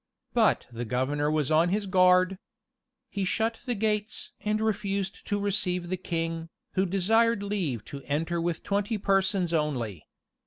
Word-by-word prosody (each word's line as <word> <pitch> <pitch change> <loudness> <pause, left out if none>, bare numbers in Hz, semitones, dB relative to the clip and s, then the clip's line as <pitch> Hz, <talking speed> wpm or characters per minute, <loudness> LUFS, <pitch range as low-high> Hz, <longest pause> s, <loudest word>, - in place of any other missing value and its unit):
But - - +3
the 120 +1 -4
governor 130 +5 0
was 155 -1 0
on 160 +3 +4
his 205 +2 0
guard. 185 0 +4 0.7
He 200 - -2
shut 225 +4 0
the 245 - 0
gates, 210 0 -1
and 210 +1 0
refused 200 -2 -2
to 205 - 0
receive 180 -3 0
the 185 - 0
king, 165 -2 -3 0.2
who 190 0 +2
desired 215 +4 +3
leave 170 - -2
to 140 - -8
enter 165 +4 -1
with 170 -1 -2
twenty 205 +2 0
persons 195 -3 +1
only. 125 - -1
185 Hz, 150 wpm, -28 LUFS, 160-205 Hz, 0.7 s, on